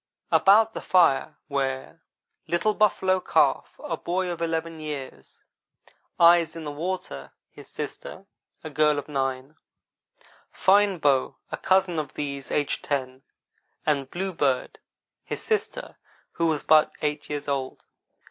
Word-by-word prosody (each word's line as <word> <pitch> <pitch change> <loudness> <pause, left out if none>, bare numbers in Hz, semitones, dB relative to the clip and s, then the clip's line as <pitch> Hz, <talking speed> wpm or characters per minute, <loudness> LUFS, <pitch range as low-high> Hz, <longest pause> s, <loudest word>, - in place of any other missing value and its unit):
About 220 +3 +5
the - - -5
fire 155 -4 +3
were 135 +2 -3 0.5
Little 175 +6 +1
Buffalo 190 -3 +2
Calf, - - +1
a - - -2
boy 180 +1 -2
of 170 - -6
eleven 165 0 -2
years; 145 -4 -7 0.8
Eyes 170 -1 +5
in 165 - -7
the 150 - -5
Water, 145 - -5 0.2
his - - -13
sister, - - -7 0.4
a 155 - -7
girl 150 +1 +3
of 145 - -4
nine; 135 0 -3 0.9
Fine 200 0 +3
Bow, 140 -4 +1
a - - -3
cousin 185 -3 +2
of 150 -3 -6
these, 140 -2 -5
aged 145 -1 -1
ten, 130 -2 -3 0.6
and 140 -3 0
Bluebird, 165 -8 -1 0.4
his - - -5
sister, 435 -1 -2 0.3
who 170 - 0
was 155 -2 0
but 155 -1 +5
eight 150 0 -2
years 145 -1 -4
old. 135 -2 -3
155 Hz, 130 wpm, -25 LUFS, 140-175 Hz, 0.9 s, About